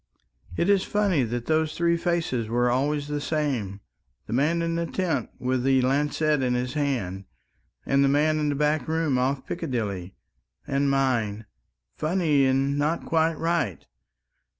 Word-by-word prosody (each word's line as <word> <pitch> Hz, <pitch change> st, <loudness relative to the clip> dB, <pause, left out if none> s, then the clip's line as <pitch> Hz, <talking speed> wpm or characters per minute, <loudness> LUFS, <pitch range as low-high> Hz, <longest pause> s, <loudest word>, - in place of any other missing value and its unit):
"It 170 Hz, -, +1 dB
is 200 Hz, -1 st, +4 dB
funny 200 Hz, -7 st, +1 dB
that 120 Hz, +1 st, -4 dB
those 155 Hz, -1 st, 0 dB
three 170 Hz, 0 st, +2 dB
faces 165 Hz, -9 st, -1 dB
were 120 Hz, +2 st, +1 dB
always 145 Hz, +3 st, 0 dB
the 145 Hz, 0 st, -3 dB
same... 130 Hz, -12 st, -2 dB, 0.4 s
the -, -, -5 dB
man 155 Hz, +7 st, +1 dB
in 165 Hz, 0 st, -1 dB
the 170 Hz, 0 st, -1 dB
tent 180 Hz, -4 st, -1 dB
with 130 Hz, 0 st, -1 dB
the 135 Hz, 0 st, +3 dB
lancet 145 Hz, +2 st, +1 dB
in 125 Hz, -1 st, +1 dB
his 125 Hz, +1 st, -2 dB
hand, 120 Hz, -11 st, -2 dB, 0.6 s
and 140 Hz, 0 st, +3 dB
the 135 Hz, -, +3 dB
man 155 Hz, +2 st, +2 dB
in 150 Hz, -1 st, 0 dB
the 145 Hz, -, 0 dB
back 150 Hz, -1 st, 0 dB
room 160 Hz, -5 st, +1 dB
off 130 Hz, +1 st, -1 dB
Piccadilly... 105 Hz, -, -4 dB, 0.5 s
and 140 Hz, 0 st, 0 dB
mine. 120 Hz, -6 st, 0 dB, 0.5 s
Funny 155 Hz, -5 st, +2 dB
and 135 Hz, +2 st, +1 dB
not 155 Hz, +3 st, 0 dB
quite 160 Hz, 0 st, +1 dB
right. 160 Hz, -, -1 dB
145 Hz, 155 wpm, -25 LUFS, 125-160 Hz, 0.6 s, is